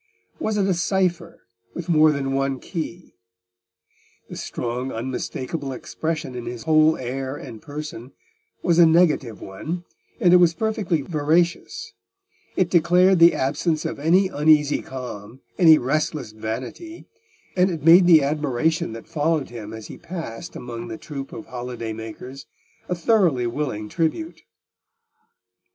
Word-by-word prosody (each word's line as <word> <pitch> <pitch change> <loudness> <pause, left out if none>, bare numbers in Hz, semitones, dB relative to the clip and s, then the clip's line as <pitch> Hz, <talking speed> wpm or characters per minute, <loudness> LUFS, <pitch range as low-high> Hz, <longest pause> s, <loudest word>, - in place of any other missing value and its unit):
Was 215 -8 -1
it 200 - +2
a 190 - +3
cypher 175 -1 -1 0.3
with 175 - -5
more 155 -2 +5
than 135 -2 -2
one 135 -1 0
key? 170 +2 -6 1.2
The - - -6
strong, 125 +2 -4
unmistakable 130 +4 -4
expression 155 +1 -4
in 120 -1 -6
his 120 -1 -6
whole 155 0 +4
air 130 +2 -4
and 115 -6 -9
person 145 -4 -7 0.5
was 170 -1 +3
a 170 - +8
negative 160 - +2
one, 160 - -5 0.4
and 175 -1 +5
it - - +9
was 170 -2 +4
perfectly 205 -7 -1
veracious; 170 - 0 0.6
it 180 -2 +1
declared 180 +2 +4
the 170 +1 +7
absence 155 +4 -1
of 160 - -4
any 175 +6 +4
uneasy 150 -2 +3
claim, 125 -2 -8 0.2
any 160 -3 +8
restless 150 -2 -1
vanity, 125 - -6 0.5
and 185 0 +3
it 165 -4 -4
made 175 +2 +8
the 160 -4 +7
admiration 150 -1 0
that 115 - -9
followed 155 -2 0
him 110 -3 -8
as 110 -1 -8
he - - -10
passed 165 -10 -7
among 120 -1 -7
the 110 -1 -6
troop 140 -1 -7
of 165 -2 -8
holiday 120 -3 -5
makers 115 +5 -9 0.4
a 180 - 0
thoroughly 170 - +2
willing 120 -4 -3
tribute. 170 - -2
155 Hz, 140 wpm, -23 LUFS, 125-170 Hz, 1.2 s, it